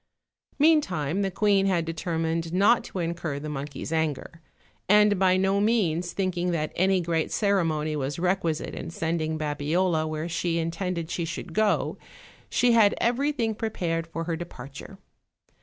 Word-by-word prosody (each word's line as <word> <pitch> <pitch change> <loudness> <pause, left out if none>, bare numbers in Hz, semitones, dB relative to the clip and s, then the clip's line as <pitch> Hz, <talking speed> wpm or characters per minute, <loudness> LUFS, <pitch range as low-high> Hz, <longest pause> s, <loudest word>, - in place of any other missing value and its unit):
Meantime 200 - +2
the 195 - 0
queen 195 0 +2
had 175 -4 +1
determined 165 0 -2
not 200 +6 +4
to - - -8
incur 170 -4 -2
the 145 +2 -6
monkey's 145 +1 -5
anger; 160 +1 -2 0.5
and 210 -1 +5
by 185 -1 +4
no 195 +1 +2
means 180 -6 +1
thinking 180 -2 -1
that 155 -3 -1
any 190 +1 +3
great 165 -2 -1
ceremony 165 -7 +1
was 140 -1 -3
requisite 175 -3 -1
in - - -6
sending 160 -2 -2
Babiola 155 +3 0
where 155 +1 -3
she 170 0 -1
in 165 0 -1
tended 170 -1 -3
she 175 - -2
should 165 0 -6
go, 215 +2 +1 0.5
she 245 - +3
had 220 -3 +5
everything 245 -1 +1
prepared 170 -7 -2
for 165 0 -4
her 165 0 -2
departure. 145 +1 -9
170 Hz, 150 wpm, -26 LUFS, 160-195 Hz, 0.5 s, and